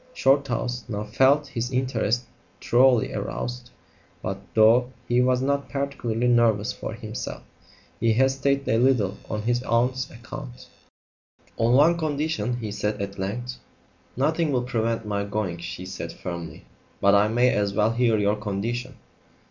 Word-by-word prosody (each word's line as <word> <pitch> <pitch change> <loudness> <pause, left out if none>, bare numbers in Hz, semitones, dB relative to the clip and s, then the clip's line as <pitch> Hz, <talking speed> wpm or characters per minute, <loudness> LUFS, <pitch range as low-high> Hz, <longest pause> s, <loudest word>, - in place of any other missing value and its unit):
Shorthouse 130 -3 +1
now 105 -2 -3
felt 135 +7 +3
his 120 -3 -3
interest 125 -2 0 0.4
thoroughly 125 -1 +3
aroused; 60 0 -4 0.5
but, 95 +1 -3 0.2
though 115 +3 +5 0.2
he 120 +1 +3
was 125 0 +2
not 140 +1 0
particularly 125 -4 -2
nervous 115 -4 +3
for - - -6
himself, - - -6 0.6
he 115 0 +3
hesitated 135 +3 +1
a 115 - +2
little 120 -6 +2
on 105 -1 -3
his 120 +2 +1
aunt's 125 +2 0
account. 120 +1 -9 0.9
"On 115 +1 +2
one 160 +6 +5
condition," 155 -4 -1
he 110 -3 -5
said 105 +1 -2
at 100 0 -5
length. 120 +6 -4 0.6
"Nothing 155 +3 +1
will 125 -2 +1
prevent 115 -2 -1
my 100 -1 -1
going," 100 -4 -3
she 90 +2 -6
said 95 - -6
firmly; 85 -2 -7 0.3
"but 100 0 +4
I 100 +1 +5
may 120 +3 +3
as 100 -1 0
well 110 +1 +3
hear 115 -1 +2
your 105 0 +1
condition." 115 +5 -3
120 Hz, 145 wpm, -25 LUFS, 105-130 Hz, 0.9 s, though